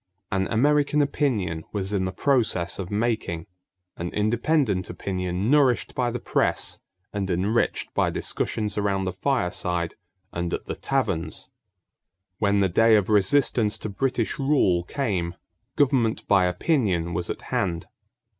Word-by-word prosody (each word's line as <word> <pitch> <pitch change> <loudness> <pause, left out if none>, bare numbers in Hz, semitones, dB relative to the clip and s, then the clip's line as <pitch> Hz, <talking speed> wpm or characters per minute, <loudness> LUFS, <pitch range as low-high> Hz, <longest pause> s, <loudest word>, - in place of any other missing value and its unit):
An 95 0 +1
American 145 +5 +2
opinion 115 - 0
was 100 -1 -2
in 95 -2 +1
the 95 - -2
process 105 -7 0
of 95 -2 -4
making 105 -6 -1 0.5
an 85 +1 -3
independent 110 - +1
opinion 90 +3 -2
nourished 140 -5 +3
by 125 -1 0
the 120 +1 -3
press - - 0 0.3
and 100 -2 -2
enriched 100 +6 0
by - - +2
discussions 105 -1 -2
around 100 -1 0
the 90 -1 -2
fireside 90 -7 -1 0.4
and 85 0 -1
at - - -8
the - - -4
taverns. 80 0 -2 0.9
When 100 -1 +2
the 95 - +4
day 115 +5 +5
of 105 -2 +2
resistance 105 +1 +3
to 110 - -5
British 120 +4 -1
rule 135 -11 +3
came, 90 -5 -2 0.4
government 130 -6 +2
by 100 -3 +4
opinion 90 - 0
was 85 +1 -2
at - - -5
hand. 85 -4 0
100 Hz, 135 wpm, -25 LUFS, 90-120 Hz, 0.9 s, day